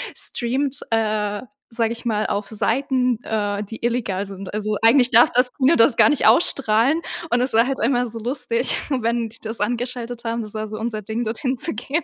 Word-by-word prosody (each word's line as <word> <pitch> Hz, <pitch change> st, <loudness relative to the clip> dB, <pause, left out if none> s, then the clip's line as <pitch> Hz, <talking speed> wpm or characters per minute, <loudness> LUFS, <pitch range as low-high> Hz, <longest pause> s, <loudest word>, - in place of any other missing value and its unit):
streamt, 265 Hz, +3 st, +1 dB
äh, 210 Hz, -2 st, -1 dB, 0.3 s
sage 230 Hz, -1 st, -1 dB
ich 235 Hz, -, -11 dB
mal, 215 Hz, -2 st, 0 dB
auf 200 Hz, 0 st, -3 dB
Seiten, 250 Hz, +2 st, 0 dB
äh, 205 Hz, -1 st, -2 dB
die 225 Hz, +3 st, -10 dB
illegal 225 Hz, -5 st, -1 dB
sind. 195 Hz, 0 st, -9 dB
Also, 210 Hz, 0 st, -2 dB
eigentlich 245 Hz, +2 st, +5 dB
darf 235 Hz, +2 st, +5 dB
das 250 Hz, 0 st, +5 dB
Kino 280 Hz, +4 st, +3 dB
das 230 Hz, +2 st, +4 dB
gar -, -, +6 dB
nicht 295 Hz, -, +2 dB
ausstrahlen 270 Hz, +1 st, +3 dB, 0.3 s
und 240 Hz, +1 st, +2 dB
es 255 Hz, -1 st, -1 dB
war 230 Hz, +2 st, +4 dB
halt 270 Hz, 0 st, -3 dB
immer 245 Hz, 0 st, +1 dB
so 230 Hz, -1 st, -7 dB
lustig, 245 Hz, 0 st, 0 dB
wenn 235 Hz, -3 st, -1 dB
die 230 Hz, -, -13 dB
das 220 Hz, 0 st, -6 dB
angeschaltet 240 Hz, +1 st, -3 dB
haben, 230 Hz, 0 st, -2 dB
das 210 Hz, -, -10 dB
war 215 Hz, 0 st, -4 dB
so 215 Hz, 0 st, -7 dB
unser 220 Hz, -2 st, -4 dB
Ding 220 Hz, +4 st, -4 dB
dorthin 255 Hz, +4 st, -3 dB
zu -, -, -3 dB
gehen. 275 Hz, +9 st, -3 dB
230 Hz, 200 wpm, -21 LUFS, 215-250 Hz, 0.3 s, gar